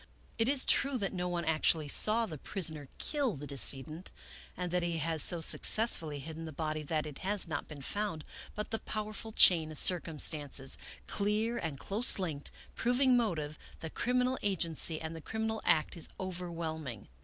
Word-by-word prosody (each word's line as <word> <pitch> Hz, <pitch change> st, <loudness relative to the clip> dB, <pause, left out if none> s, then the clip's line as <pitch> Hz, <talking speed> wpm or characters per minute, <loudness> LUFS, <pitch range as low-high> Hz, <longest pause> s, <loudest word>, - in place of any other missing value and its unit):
It 225 Hz, +2 st, +2 dB
is 275 Hz, -2 st, +2 dB
true 275 Hz, -1 st, +2 dB
that 200 Hz, -4 st, -3 dB
no 180 Hz, -1 st, -3 dB
one 175 Hz, -1 st, -3 dB
actually 155 Hz, -1 st, +1 dB
saw 220 Hz, +10 st, +6 dB
the 155 Hz, -8 st, -9 dB
prisoner 155 Hz, -7 st, -5 dB
kill 280 Hz, -, -1 dB
the 145 Hz, +1 st, -8 dB
decedent, 140 Hz, -, +1 dB, 0.5 s
and 180 Hz, -1 st, -4 dB
that 180 Hz, 0 st, 0 dB
he 170 Hz, -1 st, -2 dB
has 160 Hz, 0 st, -2 dB
so 175 Hz, -2 st, 0 dB
success 220 Hz, +7 st, +6 dB
fully 150 Hz, -3 st, -6 dB
hidden 160 Hz, +3 st, -8 dB
the 160 Hz, -, -7 dB
body 155 Hz, 0 st, -4 dB
that 155 Hz, +1 st, -3 dB
it 150 Hz, -2 st, -9 dB
has 195 Hz, 0 st, 0 dB
not 155 Hz, -3 st, -5 dB
been 145 Hz, -3 st, -10 dB
found, 200 Hz, -3 st, -4 dB, 0.3 s
but 210 Hz, +1 st, -5 dB
the 225 Hz, -, -2 dB
powerful 215 Hz, +1 st, -6 dB
chain 165 Hz, -6 st, +5 dB
of 155 Hz, -, -4 dB
circumstances, 150 Hz, -5 st, +1 dB, 0.3 s
clear 215 Hz, +3 st, -1 dB
and 160 Hz, -4 st, -5 dB
close 210 Hz, -, +5 dB
linked, 160 Hz, -7 st, -4 dB, 0.2 s
proving 250 Hz, +2 st, +2 dB
motive, 155 Hz, -11 st, -2 dB, 0.2 s
the 160 Hz, -, -7 dB
criminal 250 Hz, +1 st, -1 dB
agency, 165 Hz, -5 st, -1 dB
and 160 Hz, 0 st, -7 dB
the 160 Hz, -, -9 dB
criminal 220 Hz, +4 st, -4 dB
act, 155 Hz, -1 st, +2 dB
is 165 Hz, -, -4 dB
overwhelming. 165 Hz, -, -6 dB
170 Hz, 175 wpm, -31 LUFS, 155-210 Hz, 0.5 s, saw